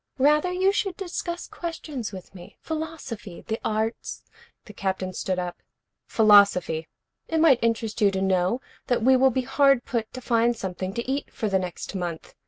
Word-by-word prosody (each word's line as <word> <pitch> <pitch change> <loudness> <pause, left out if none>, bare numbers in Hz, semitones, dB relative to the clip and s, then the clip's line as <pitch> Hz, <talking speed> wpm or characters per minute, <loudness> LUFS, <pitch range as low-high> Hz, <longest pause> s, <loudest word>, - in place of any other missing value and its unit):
Rather 300 +6 +3
you 375 +2 +3
should 390 -3 -1
discuss 350 -2 -4
questions 305 -9 -5
with 190 -1 -10
me, 180 -2 -13
philosophy, 310 - -6
the 220 0 -2
arts 220 +1 -2 0.2
" 470 - -31
The 210 - -11
Captain 190 -1 -2
stood 185 0 -2
up. 180 -1 -4 0.5
"Philosophy. 200 -7 +5 0.4
It 325 - 0
might 295 -7 +5
interest 225 -1 0
you 205 - +6
to 190 -1 -2
know 190 +5 +1 0.3
that 245 -3 +1
we 260 +2 +6
will 265 +1 +5
be 260 +1 -1
hard 275 -1 +3
put 230 -2 -2
to 255 - -6
find 235 0 +2
something 190 0 -4
to 235 - -3
eat 275 +2 -2
for 220 -4 -2
the 190 -1 +2
next 180 0 -5
month. 175 -4 -5
230 Hz, 180 wpm, -25 LUFS, 190-280 Hz, 0.5 s, you